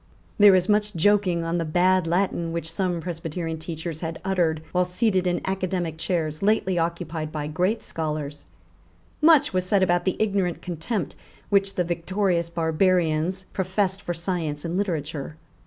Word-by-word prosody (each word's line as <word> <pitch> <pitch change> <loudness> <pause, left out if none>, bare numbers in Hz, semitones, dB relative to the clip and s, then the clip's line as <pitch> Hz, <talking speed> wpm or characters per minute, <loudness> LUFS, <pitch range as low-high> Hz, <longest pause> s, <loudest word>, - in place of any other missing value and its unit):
There 205 -2 +8
is 180 0 +2
much 210 -1 +2
joking 185 -1 +3
on 165 +1 -1
the 170 - 0
bad 180 +2 +2
Latin 170 -1 0
which 165 -1 -3
some 175 -1 -1
Presbyterian 165 -1 -4
teachers 160 0 -5
had 165 -1 -4
uttered 170 -5 +1
while 180 0 +2
seated 185 0 +1
in 175 - 0
academic 185 -4 -2
chairs 160 -4 -1
lately 195 -3 +2
occupied 165 -2 -3
by 150 -2 -3
great 180 +9 0
scholars. 150 -2 -4 0.8
Much 310 -7 +5
was 185 0 +1
said 190 +1 +2
about 175 -1 +2
the 185 - 0
ignorant 195 -5 0
contempt 175 - -3 0.3
which 195 -1 +2
the 180 - +1
victorious 175 0 0
barbarians 170 +1 +1
professed 190 +1 0
for 175 - -3
science 165 -4 -3
and 170 +1 -2
literature. 160 -6 -3
175 Hz, 155 wpm, -25 LUFS, 160-190 Hz, 0.8 s, There